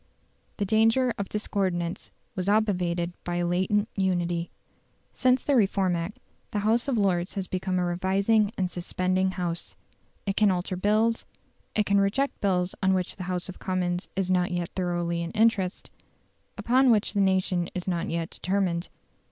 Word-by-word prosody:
The 205 - 0
danger 225 +4 +3
of 200 - -3
discordance 185 -5 -2 0.3
was 185 +1 -1
obviated 180 -5 +1
by 175 - -3
a 175 0 0
latent 190 +4 +1
unity. 175 -3 0 0.6
Since 255 -1 +2
the 285 - +2
Reform 195 -5 +2
Act 170 +5 -4 0.3
the - - -3
House 230 +4 +2
of 265 -4 +1
Lords 185 -2 +1
has 195 -2 -2
become 185 0 -2
a 180 - +1
revising 195 +4 +2
and 185 -2 -1
suspending 185 +1 0
House. 175 -2 -4 0.5
It 195 -1 -1
can 210 -1 +4
alter 185 0 -1
bills; 215 +4 +1 0.5
it 210 - +2
can 200 0 +3
reject 265 +8 0
bills 180 -2 +1
on 190 -1 +3
which 185 -1 -2
the 185 - -5
House 180 -1 -1
of 185 - -9
Commons 180 -1 -2
is 190 -1 0
not 180 0 +2
yet 175 -2 -2
thoroughly 175 -2 -1
in 170 0 -4
earnest 210 -4 +1 0.7
upon 255 +2 +3
which 215 -3 +3
the 200 - +2
nation 185 -2 +1
is 180 0 -4
not 175 -2 -1
yet 165 0 -2
determined. 185 -2 -1
185 Hz, 165 wpm, -27 LUFS, 175-205 Hz, 0.7 s, can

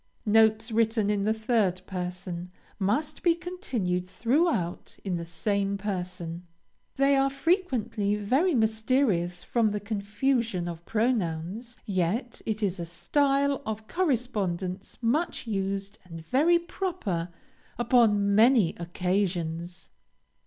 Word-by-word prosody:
Notes 220 +1 +4
written 220 -2 +2
in 200 -1 0
the 215 - +3
third 220 -5 +1
person, 180 -1 -5 0.3
must 280 +10 0
be 340 -2 +4
continued 240 - -2
throughout 235 - 0
in 185 -3 -1
the 170 0 -6
same 200 +2 -1
person; 180 -3 -4 0.5
they 275 +1 +4
are 270 0 +3
frequently 270 - 0
very 265 - +2
mysterious 220 -6 +1
from 230 -3 +2
the 210 0 -2
confusion 210 -1 -1
of 170 -1 -6
pronouns, 220 -1 -1
yet 200 +6 -1
it 215 0 -1
is 190 -2 0
a - - -2
style 280 - +1
of 220 -3 -5
correspondence 205 - -1
much 290 +9 0
used 195 -2 -3
and 165 -3 -10
very 310 - +4
proper 340 - -3 0.5
upon 215 -4 +3
many 225 -4 +5
occasions. 175 -1 -2
210 Hz, 115 wpm, -27 LUFS, 180-250 Hz, 0.5 s, many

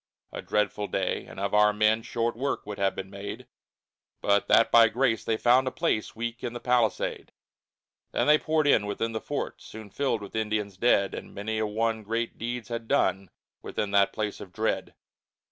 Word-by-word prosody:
A - - -6
dreadful 105 0 -1
day, 95 -1 -2
and - - -10
of 100 +1 -2
our 105 0 +5
men 110 +1 +2
Short 115 0 -2
work 140 +4 -2
would 105 0 -7
have 100 -1 +1
been 95 0 -6
made, 100 0 -7 0.7
But 100 0 +2
that 115 - +5
by 115 -1 +8
grace 115 -1 +1
they 110 - 0
found 125 +3 +4
a - - 0
place 145 -10 -1
Weak 115 +1 -5
in 120 - -3
the 120 - -5
palisade. 120 -5 0 0.8
Then - - +1
they 150 +1 +5
poured 155 -1 +1
in, 110 -8 +4
within 115 +3 -2
the 110 -1 -4
fort - - -4
Soon 110 -2 -11
filled 130 -3 -1
with 100 - -10
Indians 105 -2 -1
dead, 100 -1 +2
And - - -8
many 110 +2 -3
a 110 - 0
one 110 +1 -1
great 115 +2 -3
deeds 120 0 -4
had 115 -1 -4
done 95 -4 +1 0.3
Within 105 - -3
that 100 -1 +4
place 105 -1 -4
of 95 - -10
dread. - - -2
110 Hz, 195 wpm, -27 LUFS, 105-120 Hz, 0.8 s, by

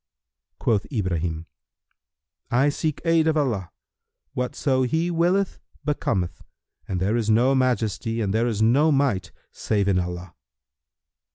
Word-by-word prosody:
Quoth 105 -4 0
Ibrahim, 85 - -2 1.0
"I 130 +4 +3
seek 155 0 -2
aid 165 -1 +3
of 160 -1 +2
Allah; 115 - 0 0.6
whatso 130 +1 0
He 160 +7 0
willeth 175 +3 +1 0.3
becometh; 95 - -1 0.5
and 95 - -2
there 100 +5 +1
is 115 -2 0
no 120 +5 +4
Majesty 115 -3 0
and 100 -3 -1
there 115 +2 +2
is 110 -2 0
no 140 +8 +4
Might 130 - +1 0.2
save 100 -2 -1
in 95 -2 +3
Allah!" 90 0 -5
115 Hz, 125 wpm, -24 LUFS, 95-145 Hz, 1.0 s, no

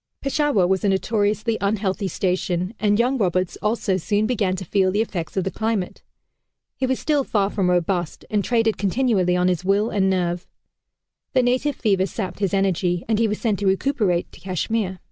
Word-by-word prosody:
Peshawar 275 - +1
was 190 +1 +1
a 205 - +3
notoriously 210 +3 0
unhealthy 200 -1 0
station, 185 0 -1
and 205 -1 +2
young 250 +3 +1
Roberts 185 -2 0
also 210 -2 0
soon 205 +4 0
began 210 -6 0
to 190 - -6
feel 190 +2 +2
the 205 - 0
effects 185 -5 -4
of 190 - +2
the 190 - -2
climate. 220 -4 -2 0.7
He 260 - -1
was 260 0 0
still 295 -3 +1
far 205 -5 0
from 190 -3 0
robust, 175 -1 -1
and 210 -2 +1
traded 225 -2 +1
continually 195 -3 +1
on 180 0 +2
his 180 -2 0
will 200 +4 +1
and 190 -2 +2
nerve. 180 -1 -1 0.9
The 255 -2 +3
native 255 +3 +1
fever 195 -4 +1
sapped 190 -4 -5
his 195 -3 0
energy, 185 -3 0
and 220 -1 +1
he 230 - +3
was 210 0 -2
sent 215 -5 0
to 200 - 0
recuperate, 190 -3 +1
to - - -15
Kashmir. 190 +1 -2
200 Hz, 185 wpm, -22 LUFS, 185-225 Hz, 0.9 s, a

